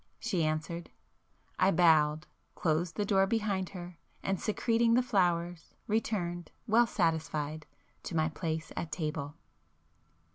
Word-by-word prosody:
she 195 -8 0
answered. 155 +2 -2 0.7
I 190 - +5
bowed,—closed 160 0 +2
the 205 - 0
door 195 -1 +3
behind 200 -4 0
her, 175 -2 -9 0.2
and 195 -2 -1
secreting 230 +1 +2
the 250 - +4
flowers, 175 -6 0
returned, 180 -6 -1 0.2
well 235 +1 +4
satisfied, 155 -5 -1 0.4
to 170 - -4
my 155 -1 +3
place 160 -1 -4
at 165 - -4
table. 150 -3 -3
175 Hz, 115 wpm, -31 LUFS, 160-200 Hz, 0.7 s, I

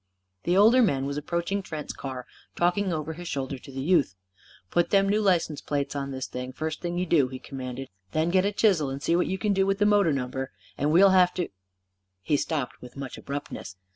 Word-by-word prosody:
The 175 +2 +3
older 225 +6 +7
man 135 - +2
was 140 0 -3
approaching 170 +6 -2
Trent's 155 -5 -6
car, 130 -2 -6 0.3
talking 180 +2 +1
over 160 -1 -3
his 175 +2 -8
shoulder 135 -2 -3
to 135 - -12
the 135 0 -4
youth. 155 - +3 0.6
"Put 175 0 +2
them 195 -1 +4
new 210 +2 +2
license 175 -7 +1
plates 145 -1 -2
on 140 -1 -3
this, 130 -1 -4 0.3
first 155 +1 -3
thing 175 0 -3
you 180 - 0
do," 155 -6 +3
he 130 0 -7
commanded. 130 0 -6 0.2
"Then 160 +6 +1
get 185 0 +4
a 200 - +1
chisel 190 -9 +2
and 135 +1 -5
see 170 - +2
what 180 - +2
you 190 - -1
can 210 0 +1
do 195 0 +2
with 195 0 +1
the 205 - +3
motor 205 -5 +4
number. 130 -1 -3 0.2
And 145 +1 0
we'll 190 +4 +7
have 180 -1 +5
to 180 -2 -2 0.4
" - - -53 0.3
He 145 - +2
stopped 145 -2 -2
with 125 +2 -12
much 135 -2 -6
abruptness. 140 -9 -6
160 Hz, 220 wpm, -27 LUFS, 135-185 Hz, 0.6 s, older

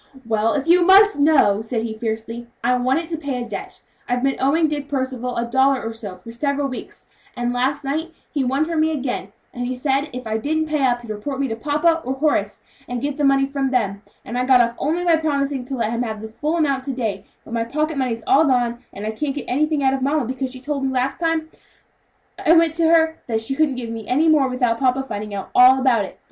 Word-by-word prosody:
"Well, 220 0 +1
if 285 -1 -1
you 350 +2 +5
must 395 0 +6
know," 270 -9 +4
said 225 0 -3
he, 225 -1 -3
fiercely, 225 +1 -5 0.2
"I 250 +1 +3
want 255 +3 +1
it 330 0 -3
to 325 - -3
pay 280 -5 -3
a - - -8
debt; 210 - -7 0.3
I've 245 +1 0
been 270 0 +2
owing 315 +5 +3
Dick 290 -2 -3
Percival 260 -3 -3
a 235 - 0
dollar 265 +2 +2
or 225 0 -4
so 205 -5 -8
for 230 - -9
several 280 +3 -1
weeks, 255 - -8 0.3
and 240 0 -1
last 265 +4 0
night 315 +5 -2 0.2
he 285 -3 0
won 270 +4 +1
from 325 -1 0
me 315 - +3
again, 260 -9 -3 0.2
and 245 0 -3
he 255 - -2
said 275 +3 0
if 250 0 -7
I 220 0 -1
didn't 315 +5 0
pay 305 -2 -1
up 245 -2 +2
he'd 235 -2 -8
report 265 +6 -5
me 275 - +1
to 225 - -2
papa, 300 +7 +1
or 260 +1 -2
Horace, 295 +2 0 0.3
and 245 0 -3
get 285 +2 -3
the 295 - -1
money 275 -1 +4
from 275 -1 -2
them; 200 -6 -1 0.2
and 245 +1 -3
I 250 - 0
got 260 -2 +6
off 235 -1 +3
only 330 +5 -1
by 335 -2 +4
promising 280 -4 -1
to 270 - -4
let 230 -3 -1
him 235 +1 -1
have 220 -3 -3
the 220 - -7
full 300 +9 -2
amount 280 -5 +1
to 275 - -2
day; 215 -6 -3 0.2
but - - -9
my 230 -1 0
pocket 305 +6 -2
money's 245 -4 -2
all 305 +4 +5
gone, 245 -3 +1
and 205 - -7
I 215 - -1
can't 275 +5 -3
get 285 - -5
anything 300 +2 +1
out 265 0 +3
of 270 - -2
mamma, 280 +1 +1
because 260 +2 -3
she 260 - -9
told 280 +1 -3
me 270 - 0
the 265 - -3
last 260 +2 -1
time 325 -2 -1 0.9
I 330 -2 +5
went 330 -2 +4
to 330 -1 +3
her, 320 -1 +3
that 225 -2 0
she 225 +4 -2
couldn't 285 -1 +1
give 235 -2 -5
me 225 -2 -7
any 295 +6 +2
more 300 -4 +4
without 250 -3 0
papa 265 0 +2
finding 210 -4 -5
out 195 - -6
all 255 +1 +7
about 245 -6 +2
it. - - -12
265 Hz, 255 wpm, -21 LUFS, 235-295 Hz, 0.9 s, all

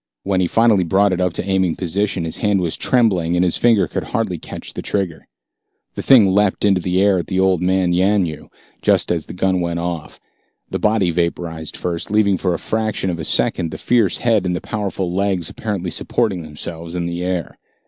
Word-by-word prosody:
When 95 -1 +1
he 90 - +2
finally 115 -2 +3
brought 95 +3 +2
it 90 - -1
up 90 -1 0
into - - -3
aiming 95 -3 +1
position, 95 +1 -1
his 80 - -2
hand 105 -2 +2
was 85 -3 -1
trembling, 95 -10 +1
and 90 +1 +2
his 90 - +2
finger 115 -4 +3
could - - -4
hardly - - -2
catch - - -8
the - - -5
trigger. 95 -6 -3 0.7
The - - -5
thing 110 -8 +5
leaped 105 0 +2
into 95 -3 +3
the 90 +1 0
air 100 -1 +3
at 85 - -5
the 95 - -1
old 95 -2 +2
man, 90 -1 +1
Yanyoo, 90 -4 0 0.3
just - - +2
as 85 -3 -2
the - - -8
gun 95 0 +1
went 85 -1 -2
off. 85 -2 -5 0.5
The - - -2
body 105 -5 +2
vaporized 85 -2 -3
first, 85 -2 -3
leaving 100 -3 +2
for 90 -2 0
a - - -2
fraction 110 -3 -2
of 85 - -5
a - - -4
second 85 +1 +1
the - - -7
fierce 115 -7 +2
head 110 -6 +1
and 90 - 0
the - - -2
powerful 95 -5 -3
legs 95 -3 -1
apparently 95 -5 -4
supporting 100 0 -1
themselves 80 +2 -7
in 85 -1 -2
the 85 +1 -3
air. 90 -2 -3
90 Hz, 210 wpm, -19 LUFS, 85-100 Hz, 0.7 s, thing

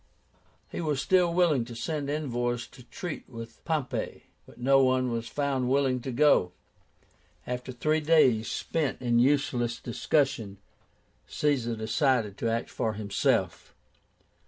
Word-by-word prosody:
He - - -4
was 150 -4 -1
still 180 +3 +3
willing 170 -7 +3
to 120 0 -9
send 145 +3 -3
envoys 120 -5 -2
to 135 - -15
treat 150 +7 -7
with 115 -2 -10
Pompey, 155 -6 -2 0.2
but - - -16
no 135 +2 +4
one 130 -1 +2
was 115 0 -3
found 135 -3 -1
willing 130 -2 +2
to 130 - -4
go. 125 -9 +3 0.9
After 125 +1 -4
three 155 +5 0
days 135 -9 +3
spent 155 -5 -2
in 120 -2 +2
useless 125 -3 +1
discussion, 120 -5 0 0.7
Caesar 130 -6 0
decided 110 -1 +1
to 115 - 0
act 115 +1 -2
for 110 - -1
himself. 105 -1 -1
130 Hz, 135 wpm, -28 LUFS, 120-145 Hz, 0.9 s, no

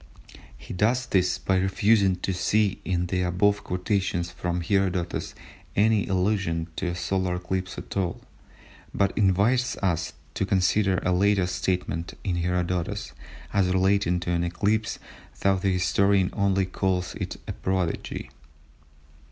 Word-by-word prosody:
He - - -9
does 115 +7 +1
this 90 -3 +2
by 95 - 0
refusing 100 0 +3
to 95 - -1
see 100 +2 +1
in 90 -2 0
the 90 +1 -1
above 95 +3 +2
quotations 90 -2 -1
from 90 +1 -2
Herodotus 90 -1 -1 0.4
any 105 0 +3
allusion 95 -3 0
to 95 - -1
a 85 - -2
solar 90 +1 -1
eclipse 90 +1 -3
at - - -8
all, 95 -3 -1 0.8
but 100 0 +1
invites 110 +6 +2
us 90 -4 -1 0.2
to - - -1
consider 95 0 +2
a 90 - +1
later 100 0 +3
statement 90 -2 -2
in 90 -3 -1
Herodotus 90 0 -1 0.4
as 100 -2 +3
relating 95 -1 +2
to 85 - -2
an 85 0 +1
eclipse 105 +5 0 0.4
though 95 -1 +3
the 95 +1 0
historian 95 +1 +2
only 100 -2 +2
calls 90 -1 -1
it - - -5
a - - -3
prodigy. 95 -3 -2
95 Hz, 135 wpm, -26 LUFS, 90-100 Hz, 0.8 s, refusing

